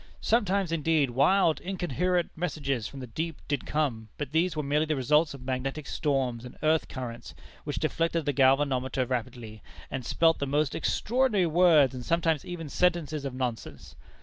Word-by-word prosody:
Sometimes, 200 Hz, -5 st, +1 dB
indeed, 155 Hz, -4 st, +1 dB
wild, 160 Hz, +6 st, +3 dB
incoherent 180 Hz, -1 st, -1 dB
messages 140 Hz, -9 st, -2 dB
from 135 Hz, -, -9 dB
the -, -, -5 dB
deep 160 Hz, +6 st, -4 dB
did 145 Hz, -2 st, -2 dB
come, 125 Hz, -8 st, -1 dB
but 145 Hz, -2 st, -5 dB
these 165 Hz, +2 st, +1 dB
were 150 Hz, -, -2 dB
merely 150 Hz, +3 st, +1 dB
the 155 Hz, -, 0 dB
results 150 Hz, +3 st, +2 dB
of 130 Hz, -, -12 dB
magnetic 135 Hz, +3 st, -3 dB
storms 130 Hz, -7 st, -1 dB
and 125 Hz, -, -11 dB
earth 155 Hz, +1 st, +2 dB
currents, 120 Hz, -3 st, -7 dB, 0.3 s
which 145 Hz, -3 st, -3 dB
deflected 165 Hz, 0 st, 0 dB
the 145 Hz, -, 0 dB
galvanometer 130 Hz, -1 st, +2 dB
rapidly, 120 Hz, -3 st, -5 dB, 0.3 s
and 130 Hz, -2 st, -3 dB
spelt 165 Hz, +6 st, +2 dB
the 140 Hz, -, -2 dB
most 145 Hz, +1 st, +1 dB
extraordinary 230 Hz, -5 st, +1 dB
words, 160 Hz, -5 st, +5 dB
and 125 Hz, -1 st, -6 dB
sometimes 165 Hz, -1 st, +1 dB
even 175 Hz, -3 st, -6 dB
sentences 155 Hz, -2 st, 0 dB
of 135 Hz, -2 st, -4 dB
nonsense. 115 Hz, -, -5 dB
145 Hz, 165 wpm, -28 LUFS, 130-165 Hz, 0.3 s, words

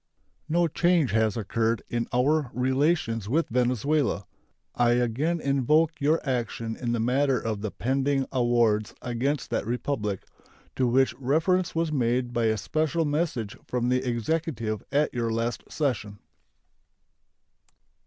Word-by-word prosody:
No 170 Hz, +2 st, +3 dB
change 170 Hz, -, +2 dB
has 110 Hz, -1 st, +1 dB
occurred 115 Hz, +2 st, 0 dB
in 120 Hz, -1 st, -2 dB
our 140 Hz, +3 st, +2 dB
relations 130 Hz, -, +1 dB
with 160 Hz, +6 st, +1 dB
Venezuela. 125 Hz, 0 st, +1 dB, 0.5 s
I 120 Hz, 0 st, +3 dB
again 125 Hz, +8 st, 0 dB
invoke 150 Hz, +3 st, +2 dB
your 155 Hz, +3 st, +3 dB
action 115 Hz, -3 st, -2 dB
in 120 Hz, -2 st, -3 dB
the 120 Hz, -, 0 dB
matter 130 Hz, +3 st, +2 dB
of 110 Hz, -3 st, -3 dB
the 110 Hz, -, -2 dB
pending 135 Hz, +4 st, 0 dB
awards 120 Hz, -4 st, +2 dB
against 125 Hz, +4 st, -2 dB
that -, -, -1 dB
Republic, 115 Hz, -5 st, -2 dB, 0.5 s
to 130 Hz, -, +2 dB
which 130 Hz, +2 st, +3 dB
reference 165 Hz, +8 st, +1 dB
was 165 Hz, -1 st, 0 dB
made 125 Hz, -2 st, 0 dB
by 120 Hz, -1 st, +1 dB
a 110 Hz, 0 st, +2 dB
special 155 Hz, -, 0 dB
message 145 Hz, -8 st, -1 dB
from 125 Hz, -1 st, -1 dB
the 125 Hz, 0 st, +2 dB
Executive 120 Hz, -3 st, -2 dB
at 150 Hz, +2 st, +1 dB
your 115 Hz, -2 st, -1 dB
last 115 Hz, +1 st, -3 dB
session. 110 Hz, -9 st, -2 dB
125 Hz, 135 wpm, -26 LUFS, 115-150 Hz, 0.5 s, No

